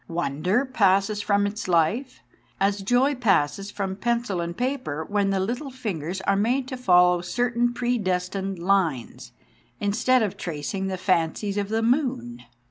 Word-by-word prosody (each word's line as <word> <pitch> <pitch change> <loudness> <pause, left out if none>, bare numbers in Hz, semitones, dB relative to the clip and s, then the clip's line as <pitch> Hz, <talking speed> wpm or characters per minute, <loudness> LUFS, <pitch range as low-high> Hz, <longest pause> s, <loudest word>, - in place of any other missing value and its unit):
Wonder 175 - 0
passes 205 -4 +2
from 205 0 +2
its 205 0 -4
life, 180 - 0 0.4
as 200 +1 +1
joy 245 +8 +2
passes 195 - +1
from 195 -2 -3
pencil 235 -3 -1
and 170 0 -5
paper 250 - -2
when 205 -1 +1
the 195 -1 +1
little 240 +9 -2
fingers 190 - -4
are 195 +1 +1
made 245 +6 +1
to 260 - -4
follow 180 -7 +4
certain 240 +6 0
predestined 195 -5 -1
lines, 160 -9 -1 0.5
instead 220 +5 +2
of 205 - -3
tracing 175 +4 -4
the 190 -1 -3
fancies 185 +2 0
of 205 -1 -2
the 225 +1 0
moon. 225 - 0
200 Hz, 145 wpm, -25 LUFS, 180-240 Hz, 0.5 s, follow